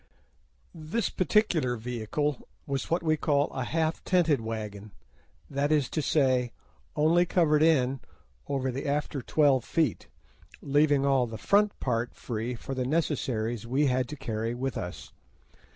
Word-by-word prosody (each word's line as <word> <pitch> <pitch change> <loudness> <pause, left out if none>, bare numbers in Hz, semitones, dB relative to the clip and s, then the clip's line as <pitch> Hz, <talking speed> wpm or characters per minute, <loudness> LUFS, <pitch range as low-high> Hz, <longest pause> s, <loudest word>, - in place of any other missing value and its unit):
This 170 +7 -2
particular 180 - +2
vehicle 125 +5 -3 0.2
was 140 -2 -3
what 170 +1 0
we 155 -1 +2
call 145 -1 +1
a 130 - -3
"half 160 +4 -1
tented" 165 -8 +2
wagon, 105 -2 -6 0.5
that 145 +1 -1
is 150 -4 +2
to 155 - -1
say, 130 -5 +2 0.4
only 160 +3 +4
covered 165 -4 +2
in 135 -5 +3 0.5
over 135 -2 -1
the 135 +3 -4
after 145 -1 -1
twelve 140 -1 +3
feet, 155 -5 -1 0.5
leaving 145 0 +2
all 135 -3 +3
the 110 -1 -7
front 205 - +2
part 120 -1 -1
free 120 +1 -4
for 135 - -6
the 130 -1 -1
necessaries 120 -6 -1
we 135 +5 +2
had 130 -2 +1
to 150 - -5
carry 115 -3 -3
with 130 +2 -3
us. 90 -1 -6
135 Hz, 145 wpm, -28 LUFS, 120-155 Hz, 0.5 s, only